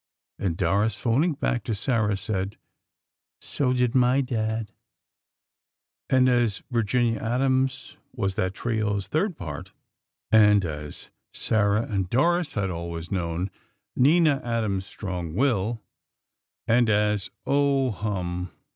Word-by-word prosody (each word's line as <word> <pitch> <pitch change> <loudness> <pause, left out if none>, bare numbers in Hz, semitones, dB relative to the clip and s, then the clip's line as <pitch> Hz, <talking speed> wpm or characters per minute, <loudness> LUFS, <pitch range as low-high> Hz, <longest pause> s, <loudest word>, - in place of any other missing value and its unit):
And 85 -4 -1
Doris, 100 +5 +1
phoning 140 +8 +1
back 125 -4 -1
to 115 - -1
Sarah, 105 -2 +1
said: 100 -1 -3 0.8
"So 135 -3 -1
did 125 -1 +1
my 130 +1 +4
Dad." 110 -4 -2 1.4
And, 130 -1 +4
as 120 -5 +1
Virginia 115 0 +1
Adams 130 +2 0
was 100 -6 -2
that 95 0 -1
trio's 105 -4 -1
third 175 - 0
part; 75 -5 -7 0.6
and 105 -3 +6
as 75 -2 -6 0.2
Sarah 105 0 +1
and 95 -5 -2
Doris 170 - +2
had 95 -3 -1
always 85 -1 -5
known 90 0 -2 0.4
Nina 150 +1 +4
Adams' 110 -5 -1
strong 90 -5 -5
will; 115 -3 0 0.8
and 120 0 +4
as, 105 -1 +1 0.2
Oh, 140 -2 +2
hum! 90 -4 -3
110 Hz, 115 wpm, -25 LUFS, 95-125 Hz, 1.4 s, and